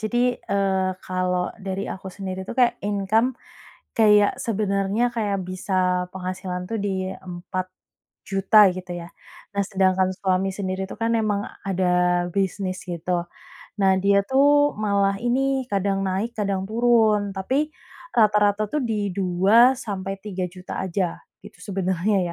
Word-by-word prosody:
Jadi, 240 +3 +1
eee, 195 -1 0
kalau 180 -1 -1
dari 195 0 -3
aku 190 0 -8
sendiri 190 0 -6
itu - - -6
kayak 245 -2 +3
income, 210 +5 +1 0.6
kayak 210 -2 +4
sebenarnya 210 +2 0
kayak 205 -5 -1
bisa 185 0 -1
penghasilan 185 0 -4
tuh 225 - -2
di 190 -2 -2
4 185 0 -6 0.6
juta, 195 +2 +5
gitu, 180 0 -7
ya. 170 -1 -7 0.5
Nah, 200 - +3
sedangkan 190 -1 +2
suami 190 0 0
sendiri 190 -1 -3
itu - - -8
kan 230 0 0
memang 210 -3 0 0.2
ada 180 -1 +2
bisnis, 190 -1 -1
gitu. 175 0 -2 0.6
Nah, 190 -1 +5
dia 200 +1 +3
tuh 290 +4 +4
malah 200 -2 +1
ini, 265 +2 +1
kadang 195 0 +1
naik, 195 +5 -1
kadang 195 -2 -1
turun. 220 -2 +3
Tapi, 265 +10 0 0.5
rata-rata 210 -1 +3
tuh 300 - +1
di 210 -4 -1
2 195 +7 +4
sampai 195 -5 -4
3 190 -3 -4
juta 180 +1 -7
aja, 180 -1 -2 0.2
gitu, 205 - -13
sebenernya 190 0 0
195 Hz, 135 wpm, -23 LUFS, 185-215 Hz, 0.6 s, juta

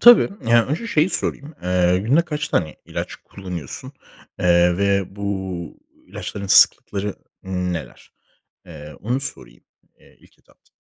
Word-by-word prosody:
Tabii. 240 0 +9 0.2
Yani 115 -1 +5
önce 175 +11 -2
şeyi 160 -6 +3
sorayım. 150 -3 -3
Eee, 90 0 +3
günde 130 - +3
kaç 150 -3 -3
tane 80 -2 0
ilaç - - -5
kullanıyorsun, 90 -7 -8 0.5
eee, 90 -1 +4
ve 100 -1 +1
bu 95 -4 -4 0.3
ilaçların 100 -1 -6
sıklıkları 100 +1 +4 0.3
neler? 90 -2 -4 0.6
Eee, 75 -3 -10
onu 125 +5 0
sorayım, - - -8 0.4
eee, - - -22
ilk - - -24
etapta. - - -29
95 Hz, 125 wpm, -22 LUFS, 90-120 Hz, 0.6 s, Tabii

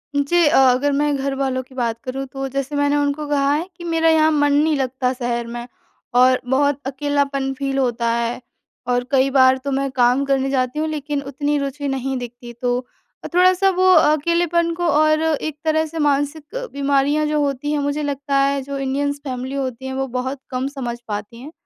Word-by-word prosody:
जी 320 +5 +3
अ, - - +3
अगर 265 +2 +4
मैं 290 +1 +1
घर 275 0 -2
वालों 265 -1 -1
की 260 +1 -19
बात 235 -3 -1
करूँ, 265 +1 -4
तो 270 +1 -5
जैसे 275 +2 -3
मैंने 285 0 +2
उनको 290 +1 -1
कहा 280 -1 +1
है 320 +4 -1
कि, 345 - -10
"मेरा 330 -1 +2
यहाँ 315 -1 +4
मन 290 -1 +2
नहीं 305 +2 +3
लगता 260 -1 -1
शहर 240 -2 -3
में 240 +1 -6 0.5
और 255 +1 +5
बहुत 285 +1 +2
अकेलापन 275 0 -1
फ़ील 275 0 -3
होता 240 -3 0
है, 235 +1 -2 0.5
और 245 0 +1
कई 270 0 +3
बार 260 -1 +5
तो 275 +2 -5
मैं 275 0 0
काम 250 +1 +3
करने 270 -1 +1
जाती 255 +1 -1
हूँ, 315 - 0
लेकिन 295 -1 -3
उतनी 285 +2 -2
रुचि 280 0 -3
नहीं 270 0 -2
दिखती।" 240 0 -8
तो 245 -1 +1 0.5
अ, - - -4
थोड़ा-सा 370 +2 +4
वो 370 0 +3
अकेलेपन 335 +2 +2
को 345 +1 -2
और 310 +1 +3
एक 310 -1 -1
तरह 315 0 +2
से 320 +1 -6
मानसिक 290 +1 0 0.3
बीमारियाँ 280 +2 +1
जो 300 0 0
होती 285 0 -1
हैं, 300 - 0
मुझे 285 +1 -1
लगता 280 -1 -2
है 275 0 +1
जो 280 +1 -5
इंडियन्स 285 +1 -1
फैमिली 260 0 -4
होती 260 -2 -4
हैं, 265 - -4
वो 270 0 -2
बहुत 260 +2 -3
कम 255 0 -2
समझ 260 -4 -5
पाती 210 +2 -5
हैं। 290 +4 -9
275 Hz, 200 wpm, -20 LUFS, 260-295 Hz, 0.5 s, और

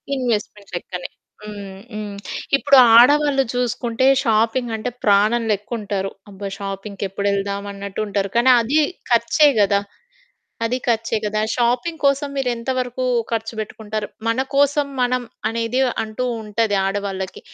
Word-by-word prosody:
Investment 210 -5 -3
లెక్కనే. 180 0 -5 0.3
హ్మ్. 200 -2 -8
హ్మ్. 210 -1 -5 0.4
ఇప్పుడు 275 - +5 0.2
ఆడవాళ్ళు 285 +2 +5
చూసుకుంటే 245 0 -1 0.2
షాపింగ్ 230 +2 +1
అంటే 220 +3 -3
ప్రాణం 210 +3 +3
లెక్కుంటరు. 205 -2 -3 0.2
అబ్బా! 195 +1 -6
షాపింగ్‌కి 195 0 -5
ఎప్పుడెళ్దాం 200 0 -1
అన్నట్టు 200 0 -7
ఉంటారు. 200 -1 -1
కానీ, 240 +2 +4
అది 275 +7 +2 0.3
ఖర్చే 235 +6 +4
కదా! 200 0 +3 0.9
అది 245 +3 0
ఖర్చే 230 -1 +1
కదా! 215 +1 -1 0.2
షాపింగ్ 250 +7 0
కోసం 280 +1 +2
మీరెంత 245 -2 -2
వరకు 255 0 -2 0.3
ఖర్చు 225 0 -2
పెట్టుకుంటారు? 215 0 -5 0.2
మన 230 +2 +1 0.2
కోసం 285 +1 +3 0.2
మనం 250 0 +1 0.3
అనేది 230 +3 -1 0.2
అంటూ 215 +3 -4 0.2
ఉంటది 215 0 0
ఆడవాళ్ళకి. 195 -1 -3
225 Hz, 125 wpm, -21 LUFS, 200-250 Hz, 0.9 s, ఇప్పుడు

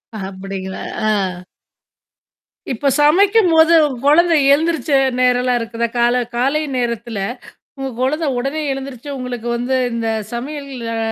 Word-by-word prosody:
அ - - -4
அப்பிடிங்களா! 190 0 -6 0.3
ஆ. - - +3 1.6
இப்ப 275 +4 0
சமைக்கும்போது 335 0 +5 0.3
குழந்தை 330 +3 +5 0.2
எழுந்திருச்ச 320 +1 0 0.3
நேரம் 250 -1 +3
எல்லாம் 250 -1 +1
இருக்குதா? 230 0 -2
கால 240 +1 +3 0.2
காலை 275 +5 +1 0.2
நேரத்துல 235 -3 -3 0.6
உங்க 270 - -3
குழந்தை 300 +5 0
உடனே 275 +5 -2
எழுந்திருச்சு. 270 0 -7
உங்களுக்கு 245 -2 -5
வந்து 245 +2 -1 0.2
இந்தச் 225 -2 -2
சமையல் 280 +4 -5 0.3
அ - - -2
255 Hz, 120 wpm, -18 LUFS, 235-300 Hz, 1.6 s, சமைக்கும்போது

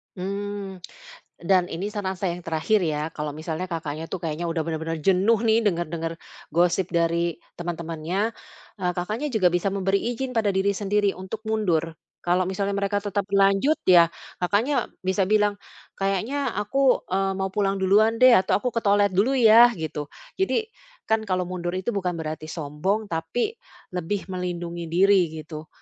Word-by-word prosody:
Mmm, 200 0 -5 0.6
dan 180 -1 +3
ini 195 +5 -4
saran 200 -3 -3
saya 180 -2 -2
yang 175 - -17
terakhir 165 +7 +2
ya, 155 0 -2
kalau 150 -1 -5
misalnya 160 +3 -4
Kakaknya 160 -2 -4
tuh 180 -3 -5
kayaknya 160 +1 -2
udah 165 -1 -1
benar-benar 160 0 -3
jenuh 195 +5 +3
nih 225 0 +4
dengar-dengar 165 -3 -1 0.4
gosip 175 +2 +2
dari 170 0 +1 0.2
teman-temannya, 170 +4 -2 0.5
eee, 180 -1 0
Kakaknya 215 +11 -2
juga 185 -5 +4
bisa 175 +3 0
memberi 195 0 +1
izin 260 +2 -4
pada 225 -4 +1
diri 195 +1 +2
sendiri 205 0 +1
untuk 200 +4 -7
mundur. 175 -7 0 0.3
Kalau 180 +1 +2
misalnya 195 +1 -1
mereka 200 0 -1
tetap 205 -1 -2
lanjut 195 +9 +4
ya, 175 -2 +7 0.3
Kakaknya 210 +10 +1 0.2
bisa 190 0 +1
bilang, 210 -1 +2 0.4
"Kayaknya 225 +8 -1
aku, 260 +6 +2
eee, 195 0 +1
mau 190 0 -2
pulang 195 -1 0
duluan 205 +4 +4
deh," 255 0 +9
atau, 190 - +1
"aku 250 +4 -2
ke 230 - +1
toilet 200 -1 +3
dulu 210 +9 +2
ya," 230 0 +8
gitu. 155 -3 -5 0.3
Jadi 385 +4 +1 0.4
kan 220 0 +1
kalau 185 -1 0
mundur 175 0 -4
itu 190 +5 -2
bukan 180 -3 -1
berarti 155 -1 -5
sombong, 160 +8 -2
tapi 165 - -1 0.4
lebih 185 +2 -3
melindungi 175 -2 -4
diri, 190 +1 +4
gitu. 155 0 -8
190 Hz, 160 wpm, -24 LUFS, 170-205 Hz, 0.6 s, deh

